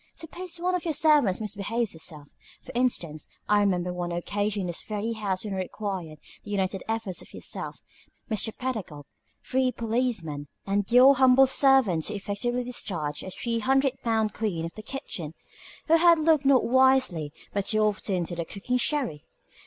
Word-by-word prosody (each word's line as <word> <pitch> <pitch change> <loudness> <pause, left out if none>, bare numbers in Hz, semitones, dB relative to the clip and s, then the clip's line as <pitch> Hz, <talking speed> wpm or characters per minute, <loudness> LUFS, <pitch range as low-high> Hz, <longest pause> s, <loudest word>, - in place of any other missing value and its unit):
Suppose 350 +2 -6
one 360 +2 -1
of 360 - -1
your 320 -3 -1
servants 295 -11 +4
misbehaves 215 +2 -2
herself, 155 -2 -5 0.4
for - - -10
instance 175 -11 -1 0.2
I 210 0 +4
remember 180 -3 +1
one 175 -1 -3
occasion 205 +4 -2
in - - -3
this 175 -2 -4
very 215 +1 -3
house 205 -3 -3
when 205 - -4
it - - -3
required 185 -4 -4 0.3
the - - -11
united 195 -2 -1
efforts 225 -5 -3
of - - -14
yourself, - - -4 0.5
Mr. 220 -1 +1
Pedagog, 210 - -4 0.4
three 260 0 +1
policemen, 220 - -2 0.2
and 200 +2 -1
your 255 +3 +8
humble 260 0 +6
servant 265 - +4
to 210 - -3
effectively 225 +5 -2
discharge 170 -12 -3
a - - -7
three 230 +4 -2
hundred 270 +2 +1
pound 220 -2 0
queen 190 -7 -2
of 165 - -7
the 215 - -9
kitchen, 180 - -6 0.5
who 325 +1 +5
had 340 0 +6
looked 310 -2 +3
not 270 -2 +5
wisely 260 - +3 0.2
but 200 -1 -1
too 215 +1 +2
often 210 -2 0
on 180 - 0
the 170 0 -3
cooking 205 +9 -2
sherry. 250 - -1
215 Hz, 170 wpm, -26 LUFS, 185-255 Hz, 0.5 s, your